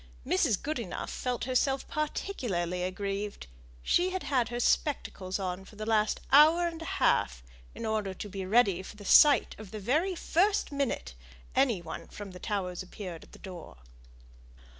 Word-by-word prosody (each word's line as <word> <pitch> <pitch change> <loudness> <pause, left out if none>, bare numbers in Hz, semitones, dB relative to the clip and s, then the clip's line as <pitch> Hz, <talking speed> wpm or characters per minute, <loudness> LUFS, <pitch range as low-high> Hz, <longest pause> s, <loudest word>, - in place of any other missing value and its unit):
Mrs. 190 +2 +2
Goodenough 245 - -4
felt 250 -2 -2
herself 265 +2 +1
particularly 220 - -2
aggrieved; 200 +2 -3 0.4
she 360 +1 +3
had 375 0 -3
had 255 -5 +1
her 240 0 -3
spectacles 195 -8 0
on 185 -1 -3
for 200 - -15
the 215 +1 -5
last 215 -1 +1
hour 315 +5 +7
and 330 -1 -6
a - - -5
half, - - +2 0.3
in - - -5
order 215 -3 -1
to 205 - -6
be 195 -1 -5
ready 195 -2 +3
for 190 - -10
the 205 -1 -12
sight 290 +8 +6
the 215 0 -8
very 310 - +1
first 385 +4 +1
minute 270 - -2 0.4
any 245 -9 +2
one 160 -1 -7
from 205 -2 -9
the 180 - -10
Towers 185 -3 -3
appeared 185 -2 -8
at - - -22
the - - -11
door. 175 - -10
215 Hz, 160 wpm, -30 LUFS, 185-275 Hz, 0.4 s, hour